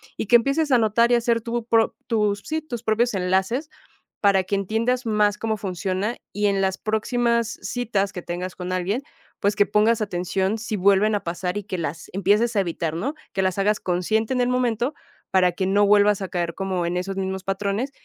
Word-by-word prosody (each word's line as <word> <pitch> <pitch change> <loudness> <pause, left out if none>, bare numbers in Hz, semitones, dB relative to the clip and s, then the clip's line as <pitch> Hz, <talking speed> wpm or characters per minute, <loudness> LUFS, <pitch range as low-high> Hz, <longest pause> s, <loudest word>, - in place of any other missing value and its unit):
y - - -4
que 240 - +5
empieces 275 +5 0
a 250 - +6
notar 230 +1 +3
y - - +6
hacer 235 -1 +1
tu 235 0 -3
pro 230 -1 +2
tus 210 -3 +1
sí, 315 0 -2
tus 240 -7 -7
propios 235 +2 +1
enlaces 190 - 0 0.5
para 195 -2 +3
que 185 - -2
entiendas 225 +6 0
más 210 -2 +2
cómo 220 -1 -2
funciona 195 +2 -2 0.2
y 205 0 0
en 195 -1 +1
las 190 -1 0
próximas 235 +1 0
citas 205 -6 -1
que 180 - -6
tengas 175 +1 -5
con 180 0 -6
alguien, 185 +7 -1 0.4
pues 205 +1 +1
que 205 -1 +4
pongas 215 +2 +3
atención 190 +1 -1
si 220 0 -3
vuelven 200 +2 +3
a 205 - -5
pasar 175 +2 -3
y 205 - -6
que 190 -2 -4
las 160 -1 -5
empieces 210 +5 +2
a 200 - +3
evitar, 165 -3 -2
¿no?, 220 - -2 0.2
que 190 - 0
las 185 0 0
hagas 210 +2 +2
consciente 215 +6 0
en 255 - 0
el 245 - +2
momento 250 +1 0 0.4
para 180 -1 +4
que 185 +2 -2
no 205 +2 +3
vuelvas 205 0 +4
a 190 - -3
caer 170 -1 -2
como 190 -2 -2
en 175 - -2
esos 190 +1 -4
mismos 190 0 -3
patrones. 200 +6 -2
205 Hz, 205 wpm, -23 LUFS, 190-230 Hz, 0.5 s, a